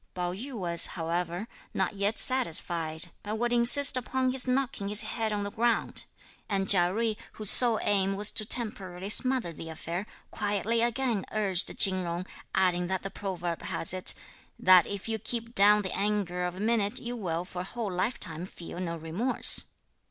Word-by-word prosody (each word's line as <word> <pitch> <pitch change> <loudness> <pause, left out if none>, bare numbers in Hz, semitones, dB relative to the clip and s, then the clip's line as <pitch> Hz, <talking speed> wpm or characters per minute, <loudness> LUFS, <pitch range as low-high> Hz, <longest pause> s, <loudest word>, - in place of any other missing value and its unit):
Pao 180 -1 -3
yü 255 +9 -9
was, 170 -5 +4
however, 175 +4 -4 0.3
not 190 +2 -1
yet 200 +2 -2
satisfied, 170 -9 0
but 210 +1 -5
would 240 +1 -2
insist 245 +4 +5
upon 255 +1 -1
his 260 0 -1
knocking 250 -6 -2
his 210 +2 +5
head 220 0 -4
on 205 -1 -3
the 205 - -6
ground, 235 +2 -2 0.4
and 195 -2 -2
Chia 175 -3 +3
Jui, 220 +2 -2 0.2
whose 215 -2 +6
sole 235 -3 +10
aim 195 -1 0
was 205 +1 0
to 220 0 0
temporarily 200 -4 -3
smother 255 -8 +2
the 165 +1 -10
affair, 170 +5 -7 0.2
quietly 210 +3 -2
again 235 -3 -1
urged 200 -4 0
Chin 185 -1 +5
Jung, 175 +1 -5 0.3
adding 180 -1 0
that 190 0 -4
the 195 - -7
proverb 175 -4 -6
has 165 - +1
it: 185 -1 +3 0.4
"That 185 -2 +4
if 200 +1 -6
you 225 -1 -3
keep 230 +2 -5
down 210 0 +4
the 190 - -5
anger 195 -3 -2
of 180 0 -5
a - - -10
minute, 215 -1 -1
you 240 +1 -6
will 175 -6 -4
for 180 - -9
a - - -6
whole 215 +1 -6
life 200 +7 -3
time 165 +1 -5
feel 175 -1 -11
no 170 -2 -5
remorse." 165 +11 +1
200 Hz, 180 wpm, -27 LUFS, 180-230 Hz, 0.4 s, sole